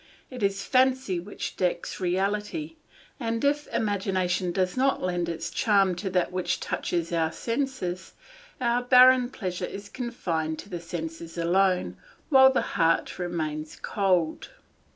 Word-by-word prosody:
It 250 -2 -7
is 195 0 0
fancy 255 -7 +2
which 190 +4 -6
decks 180 -1 -1
reality, 205 - -1 0.5
and 230 0 -1
if 290 +1 +1
imagination 185 -3 0
does 185 0 0
not 265 +1 +2
lend 175 -1 -1
its 165 - -4
charm 200 -4 +3
to 190 +1 -3
that 180 -1 0
which 180 -1 -1
touches 170 -1 -2
our 160 -1 +1
senses, 230 -8 -3 0.5
our 240 -1 +1
barren 250 0 +6
pleasure 185 -8 -5
is 200 +1 -8
confined 165 -11 -3
to 200 - -10
the 175 -3 -5
senses 165 0 -6
alone, 180 +2 +1 0.3
while 265 -2 +7
the 265 - +1 0.2
heart 165 +2 +2
remains 155 -3 -3
cold. 185 -6 0
190 Hz, 135 wpm, -27 LUFS, 175-240 Hz, 0.5 s, while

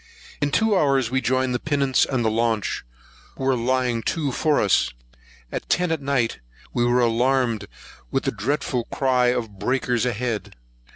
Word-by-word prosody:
In 145 - +2
two 220 +7 +2
hours 135 -8 +2
we 130 0 +1
joined 130 0 +1
the 125 - 0
pinnace 140 -3 +2
and 130 -3 0
launch, 110 -1 0 0.5
who - - -5
were 135 0 +3
lying 125 -1 0
to 145 +2 -1
for 150 +3 +2
us. 100 - +3 0.6
At - - -5
ten 180 -1 +2
at 160 -2 -1
night 135 -4 0 0.3
we 120 - +1
were 120 +1 +3
alarmed 120 -2 +1 0.4
with - - -1
the - - 0
dreadful 120 +2 -1
cry 130 -2 +1
of 115 -5 -2
breakers 125 +1 0
ahead. 120 -2 -3
125 Hz, 160 wpm, -23 LUFS, 115-135 Hz, 0.6 s, were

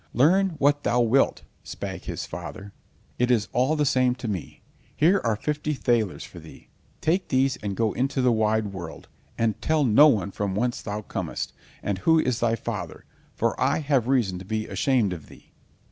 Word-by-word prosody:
"Learn 180 +7 +4
what 145 0 +3
thou 125 - +1
wilt," 120 +4 +2 0.2
spake - - -7
the - - -5
father, 100 0 -7 0.5
"it 125 0 +2
is 115 -4 +2
all 130 +5 +2
the 150 -1 +1
same 130 -3 +2
to 125 -2 -6
me. 95 -7 -5 0.3
Here 180 +6 +4
are 115 -2 +1
fifty 150 +5 -2
thalers 115 -7 0
for 90 - -11
thee. 80 -1 -14 0.3
Take 180 +4 +1
these 135 0 +1
and 100 -2 -4
go 115 -2 +1
into 135 +2 -1
the 125 -1 +4
wide 110 -2 +1
world, 85 -4 -8 0.3
and 115 -2 0
tell 155 -1 +2
no 135 +5 +7
one 100 -8 +1
from 100 -1 -3
whence 120 +4 -1
thou 105 0 -5
comest, - - -4 0.3
and 100 -2 -2
who 160 - +4
is 125 -6 0
thy 115 -1 +2
father, - - -6 0.3
for - - +1
I - - +3
have 135 -5 +1
reason 115 -9 +1
to 95 - -10
be 110 +2 -2
ashamed 120 -9 +1
of 80 -4 -9
thee." - - -17
120 Hz, 190 wpm, -25 LUFS, 105-140 Hz, 0.5 s, no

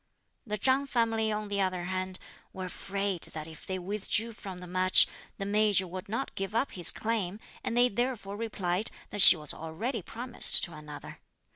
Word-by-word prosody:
The 210 0 -3
Chang 265 +6 +1
family, 225 -3 0
on 210 0 -3
the 200 -1 -2
other 185 -2 -2
hand, 185 +1 -4 0.4
were 185 -1 -6
afraid 195 0 -4
that 155 -1 -6
if 160 -1 -13
they 190 - -3
withdrew 210 +4 -2
from 195 -4 -9
the 180 - -10
match, 185 +1 +4 0.3
the 195 - -5
Major 205 -1 +2
would 185 +3 -8
not 230 +6 -4
give 195 +2 -5
up 250 +4 0
his 175 -3 +6
claim, 215 -3 -1 0.2
and 235 - -3
they 245 +1 +5
therefore 240 -3 -3
replied 205 -3 -3 0.2
that 205 - +2
she 190 - +12
was 150 -2 -3
already 200 +10 -5
promised 240 +7 +3
to 175 - -1
another. 150 -1 -10
200 Hz, 180 wpm, -29 LUFS, 185-225 Hz, 0.4 s, she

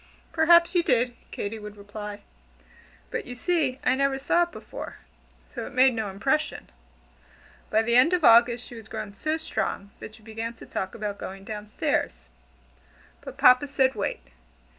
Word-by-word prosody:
"Perhaps 340 +1 +5
you 350 - +4
did," 245 -5 +1
Katy 220 +2 -5
would 210 0 -9
reply, 205 0 -8 0.9
"but - - -3
you 245 - -6
see 290 -2 0
I - - +3
never 275 0 +1
saw 285 +6 +2
it 345 0 0
before, - - -8 0.6
so - - -5
it - - -11
made 260 0 +5
no 220 -3 -3
impression." 270 - -1 1.0
By 220 +1 +3
the 235 +1 +1
end 255 +7 +6
of 360 -2 +1
August 235 0 +6
she - - -11
was 225 -2 -10
grown 215 -2 -6
so 310 +10 -1
strong, 200 -10 -3
that 215 - -9
she 220 - -19
began 225 +1 -5
to - - -12
talk 190 0 -4
about 210 -2 -4
going 195 +1 -7
down 210 0 -7
stairs. - - -2 1.0
But - - -9
Papa 255 +3 +6
said, 265 -1 +2
"Wait." 205 -2 -3
235 Hz, 170 wpm, -26 LUFS, 210-275 Hz, 1.0 s, end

